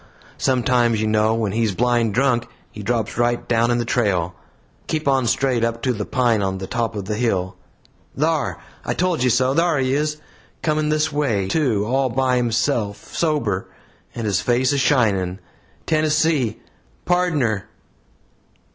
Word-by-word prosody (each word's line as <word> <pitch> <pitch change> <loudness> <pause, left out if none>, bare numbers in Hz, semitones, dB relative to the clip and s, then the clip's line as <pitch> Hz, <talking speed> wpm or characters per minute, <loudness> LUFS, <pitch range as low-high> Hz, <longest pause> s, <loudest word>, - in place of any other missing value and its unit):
Sometimes, 120 -3 +2
you 110 - 0
know, 110 +1 +2
when 110 -3 -1
he's 110 -2 0
blind 120 -1 +1
drunk, 125 -2 +2 0.2
he 105 - -8
drops 115 +1 -1
down - - 0
right 120 0 -1 0.2
in 120 - +2
the 120 - -1
trail. 95 -8 0 0.5
Keep 155 -2 -2
on 135 -3 +2
straight 125 0 +1
up 115 0 -1
to 130 - +1
the 105 -2 -4
pine 120 -5 +2
on 95 -1 -1
the 95 - -5
top 115 +2 -2
of 100 -2 -4
the 105 - -2
hill. 95 -5 -1 0.6
Thar 155 -2 0 0.3
I - - -2
told 180 -4 0
you 125 - +3
so! 130 +2 +2
thar 165 0 +2
he 130 -1 +1
is 150 +1 0 0.5
coming 155 -1 +1
this 155 +1 +1
way, 120 -10 0
too 115 -6 +1
all 130 +3 +1
by 130 +1 +1
himself, 115 -3 -1
sober, 130 - 0 0.5
and 115 - -4
his 100 -4 +1
face 125 +3 +2
a 140 - +1
shining. 100 -10 +2 0.5
Tennessee! 155 -5 +1 0.5
Pardner!" 150 - 0
120 Hz, 160 wpm, -21 LUFS, 110-140 Hz, 0.6 s, you